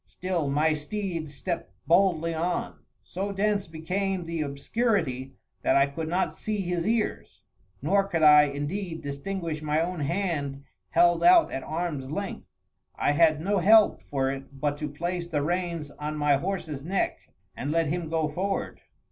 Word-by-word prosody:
Still 180 -5 -2
my 155 +3 +2
steed 165 +1 -4
stepped 165 +5 -4
boldly 170 -2 +3
on. 160 - -2 0.2
So 195 +3 -4
dense 200 0 0
became 180 +3 -2
the 165 -1 -3
obscurity, 140 - -1 0.3
that - - +2
I 140 - +6
could 155 +3 -5
not 180 +3 0
see 215 -2 -3
his 175 0 -2
ears; 225 -1 -2 0.4
nor 195 +6 +3
could 170 -5 -1
I, 150 -1 +8
indeed, 160 +5 -4
distinguish 155 +3 -4
my 155 0 +1
own 175 +1 -1
hand 145 -4 -2 0.3
held 175 - +4
out 350 -1 +6
at 135 - -3
arms 155 -5 -3
length. 200 +6 -5 0.5
I - - +1
had 155 0 +4
no 200 +3 +1
help 215 +4 +5
for 135 -1 -1
it 135 0 -8
but 145 0 0
to 150 - -3
place 170 +4 -3
the 150 -4 -1
reins 170 -2 -2
on 150 +1 -5
my 145 -1 +3
horse's 165 -4 -3
neck 185 +5 -1 0.4
and 140 - -4
let 165 +2 +2
him 165 +1 -2
go 160 -1 +1
forward. 190 +6 -3
165 Hz, 160 wpm, -27 LUFS, 150-185 Hz, 0.5 s, I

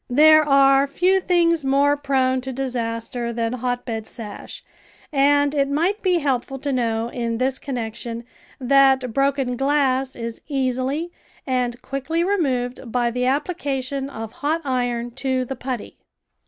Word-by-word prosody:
There 310 +4 +7
are 275 -1 +5
few 365 +7 +2
things 335 -3 +2
more 280 +2 +3
prone 265 -2 +1
to 265 +1 -5
disaster 240 -2 -3
than 230 0 -2
hotbed 245 -3 -3
sash, 215 -4 -8 0.5
and 285 +1 +3
it 280 -2 +1
might 345 +9 0
be 365 -2 +2
helpful 270 -3 -1
to 280 +1 -3
know 230 -2 0
in 235 -2 -2
this 260 +2 0
connection 235 -2 -5 0.4
that 265 -2 +4
broken 275 -2 +1
glass 270 -1 +1
is 230 -1 -6
easily 270 +4 -1 0.3
and 250 -2 -1
quickly 275 +5 -2
removed 260 - -1
by 240 -1 +1
the 250 +1 -1
application 275 -2 -2
of 225 -4 -7
hot 310 +6 -1
iron 245 -2 -1
to 260 -2 0
the 270 - -5
putty. 250 -3 -6
265 Hz, 140 wpm, -22 LUFS, 245-280 Hz, 0.5 s, There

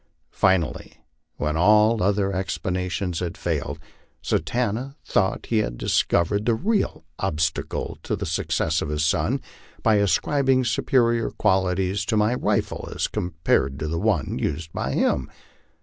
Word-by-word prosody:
Finally, 95 -4 +1 0.4
when 75 +1 -1
all 105 +5 +4
other 100 0 +1
explanations 90 -1 -2
had 85 -2 -4
failed, - - -2 0.5
Satanta 125 +3 -1
thought 95 -2 0
he 115 - +1
had - - -2
discov 85 +6 +2
ered 105 0 -1
the 115 - +4
real 200 - -1
obstacle 80 -4 -2
to - - -2
the - - -4
success 80 0 0
of 75 - -3
his 75 +1 0
son, 80 - +1 0.4
by 110 -2 +4
ascribing 130 +6 +2
superior 115 -1 +2
qualities 95 0 +1
to 110 - 0
my 105 +3 +3
rifle 125 - -1
as - - 0
compared 80 -5 0
with 75 0 -3
the 85 - -1
one 100 -8 0
used 80 +1 -3
by - - -2
him. 65 - +1
95 Hz, 140 wpm, -24 LUFS, 85-110 Hz, 0.5 s, all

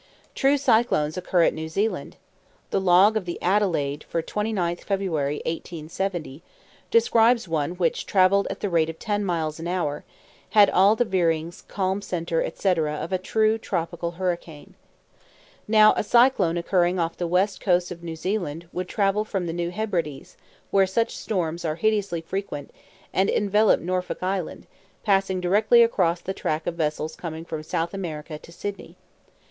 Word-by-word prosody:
True 275 +1 +3
cyclones 220 - +2
occur 180 -1 +1
at - - +3
New 160 0 -5
Zealand. 205 +7 -2 0.6
The - - +1
log 190 +4 +5
of 215 -4 -1
the 175 - -5
Adelaide 170 -7 0
for 165 - -2
29th 190 -4 -2
February, 160 -8 -1
1870, 165 -1 -4 0.5
describes 235 - +4
one 160 0 -1
which 180 -2 -1
travelled 195 +1 +3
at 195 - -6
the 205 - -1
rate 165 -2 +2
of 160 - -7
ten 205 +2 -2
miles 160 -4 -2
an 165 - -5
hour, 175 -5 -1
and - - -15 0.5
had 205 -2 +7
all 195 +4 +5
the 245 - +1
veerings, 170 -4 0
calm 190 0 -1
centre, 170 -3 -2
etc., 160 -4 0
of 165 - -5
a 185 - +1
true 220 +3 +1
tropical 170 -3 -3
hurricane. 170 -4 -4 0.9
Now 215 0 +6
a - - 0
cyclone 235 -7 +3
occurring 175 +1 +1
off 165 -1 -1
the 175 - -3
west 185 +4 +1
coast 180 -2 +1
of 170 -1 -8
New 165 -1 -6
Zealand 170 -3 -3
would 180 0 -4
travel 205 0 +1
from 195 -4 -3
the 165 - -3
New 170 0 -2
Hebrides, 175 -8 -3 0.4
where 195 -1 +4
such 230 +5 0
storms 170 -4 -2
are 155 -2 -1
hideously 200 -3 0
frequent, 165 -4 -5 0.4
and 190 +1 +2
envelop 210 +1 +3
Norfolk 180 +1 -3
Island, 185 -2 -3 0.4
passing 195 -2 +2
directly 205 +6 +4
across 180 -7 +1
the 190 - -4
track 155 -4 -2
of 175 - -1
vessels 155 -1 -2
coming 165 -1 -6
from 160 -2 -5
South 165 +3 -2
America 155 -5 -5
to 170 - -15
Sydney. 200 +3 -7
180 Hz, 165 wpm, -24 LUFS, 165-200 Hz, 0.9 s, had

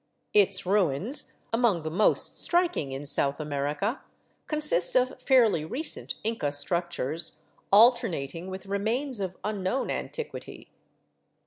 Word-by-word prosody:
Its 200 -2 +3
ruins, 195 - +1
among 225 -8 +2
the 155 - -4
most 205 +6 +2
striking 345 - +2
in 135 +2 -5
South 140 0 0
America, 150 - -2 0.5
consist 300 - +2
of 255 0 +3
fairly 235 - +4
recent 260 - -4
Inca 225 -8 -1
struc 170 +5 +1
tures 160 0 -3 0.3
alternating 195 - +3
with 190 +1 -7
remains 225 +6 -2
of 185 -2 -4
unknown 210 +4 -2
antiquity. 470 - -6
195 Hz, 115 wpm, -27 LUFS, 160-240 Hz, 0.5 s, fairly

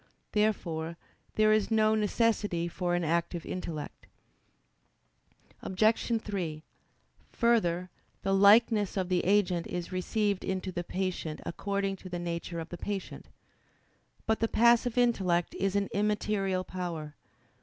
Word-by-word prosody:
Therefore 170 -6 -1 0.4
there 215 0 +5
is 215 -1 +2
no 215 -1 +3
necessity 210 -5 +1
for 175 0 -1
an 175 - 0
active 170 +1 -1
intellect. 165 -5 -6 1.5
Obj. 220 +4 +1
3: 170 -7 -4 0.7
Further, 185 -7 +1 0.3
the 195 - +1
likeness 205 +1 +5
of 185 -1 -1
the 180 -1 +1
agent 185 -3 +2
is 175 0 -5
received 200 +2 -1
into 190 0 -2
the 175 -1 -3
patient 180 -4 -3
according 195 +2 -2
to 185 - -10
the 175 - -3
nature 170 0 -4
of 165 0 -6
the 175 - -7
patient. 200 -2 -5 1.0
But 220 0 +1
the 225 - +2
passive 235 +1 +3
intellect 190 -8 +2
is 195 +1 -1
an 200 -1 +1
immaterial 205 -2 0
power. 170 -5 -5
190 Hz, 125 wpm, -30 LUFS, 175-210 Hz, 1.5 s, there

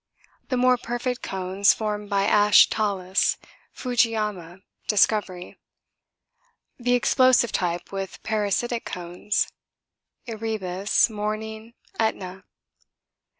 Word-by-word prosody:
The 255 - 0
more 250 0 +3
perfect 240 +2 -3
cones 190 +1 +1
formed 210 -1 -4
by 200 -1 +1
ash 210 0 +5
talus 195 -3 0 0.3
Fujiama, 210 -7 -1 0.2
Discovery. 200 -4 +1 1.2
The 245 0 +2
explosive 245 -2 +3
type 175 -1 -2
with 195 -1 -6
parasitic 220 +2 -1
cones 180 +3 -3 0.7
Erebus, 215 -4 0
Morning, 220 +1 -5 0.2
Etna. 190 -4 -2
210 Hz, 85 wpm, -24 LUFS, 190-230 Hz, 1.2 s, ash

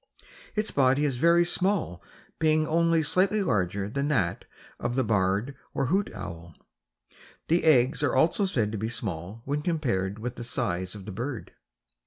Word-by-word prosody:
Its 215 0 0
body 135 +2 +3
is 135 -4 -1
very 170 +5 +4
small 180 - 0 0.4
being 155 -1 +3
only 165 0 +2
slightly 195 +6 +2
larger 100 - 0
than 140 +6 -2
those 100 - +1 0.4
of 120 +1 -2
the 130 - +2
barred 105 +4 0 0.2
or 135 - +1
hoot 200 +1 +1
owl. 85 -4 -8 0.9
The 170 +2 +3
eggs 135 -2 +4
are 145 -3 +1
also 165 +9 +3
said 115 - 0
to 110 - -4
be 110 +2 -2
small 100 -1 -4
when 145 +2 -1
compared 120 - -1
with 120 +3 -5
the 120 - -5
size 95 -5 -2
of 100 -2 -10
the 105 - -6
bird. 120 +5 -5
130 Hz, 165 wpm, -27 LUFS, 100-160 Hz, 0.9 s, very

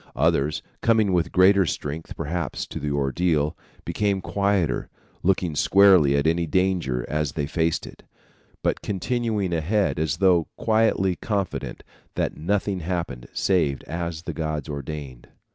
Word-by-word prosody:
Others, 75 +2 +1 0.2
coming 110 -4 +3
with 85 -2 +1
greater 95 +2 +5
strength 75 +2 -4
perhaps 85 0 -3
to - - -7
the 75 - -3
ordeal, 75 +2 0 0.3
became 100 -2 0
quieter, 100 -6 0 0.3
looking 90 -3 +1
squarely 90 -5 +5
at 70 - +1
any 85 +1 +1
danger 85 -9 0
as 75 -3 -1
they 75 -1 -1
face 80 +2 0
it, - - -12 0.6
but - - 0
continuing 105 -1 -1
ahead 90 +3 +1
as 80 -3 0
though 90 -4 +3
quietly 110 -4 +2
confident 100 -2 -3 0.3
that - - -1
nothing 95 +3 -1
happened 85 -9 -4
save 80 -8 +1
as 85 -1 -4
the - - -4
gods 75 -3 -3
ordained." 70 -3 -7
85 Hz, 135 wpm, -24 LUFS, 75-95 Hz, 0.6 s, greater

